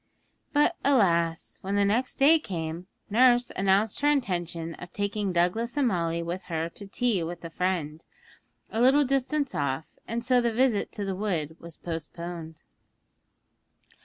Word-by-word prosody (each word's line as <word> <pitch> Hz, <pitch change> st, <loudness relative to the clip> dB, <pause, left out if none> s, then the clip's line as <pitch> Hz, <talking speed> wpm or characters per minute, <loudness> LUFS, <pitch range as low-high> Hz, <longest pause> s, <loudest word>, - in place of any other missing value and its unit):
But, 295 Hz, 0 st, +3 dB
alas! 170 Hz, -11 st, +2 dB
when 195 Hz, +1 st, -2 dB
the 205 Hz, 0 st, +3 dB
next 235 Hz, +6 st, 0 dB
day 305 Hz, +4 st, +6 dB
came, 170 Hz, -, -5 dB, 0.2 s
nurse 245 Hz, +1 st, +5 dB
announced 195 Hz, +4 st, +2 dB
her 290 Hz, -, +3 dB
intention 175 Hz, -, 0 dB
of 180 Hz, -, -9 dB
taking 205 Hz, -1 st, -2 dB
Douglas 180 Hz, +9 st, 0 dB
and 280 Hz, -3 st, +3 dB
Molly 170 Hz, -4 st, 0 dB
with 175 Hz, +2 st, -4 dB
her 165 Hz, -1 st, -2 dB
to 200 Hz, +4 st, -11 dB
tea 220 Hz, -2 st, 0 dB
with 170 Hz, +1 st, -5 dB
a 165 Hz, -, -7 dB
friend, 165 Hz, -4 st, -2 dB, 0.7 s
a 225 Hz, -, -1 dB
little 275 Hz, +4 st, +5 dB
distance 275 Hz, +2 st, 0 dB
off, 140 Hz, +1 st, -1 dB, 0.2 s
and 235 Hz, +1 st, -3 dB
so 250 Hz, -1 st, +4 dB
the 235 Hz, -1 st, +1 dB
visit 235 Hz, -2 st, +1 dB
to 205 Hz, -, -4 dB
the 195 Hz, -, -2 dB
wood 170 Hz, -6 st, -2 dB
was 170 Hz, -1 st, -10 dB
postponed. 165 Hz, 0 st, -6 dB
195 Hz, 155 wpm, -27 LUFS, 170-240 Hz, 0.7 s, day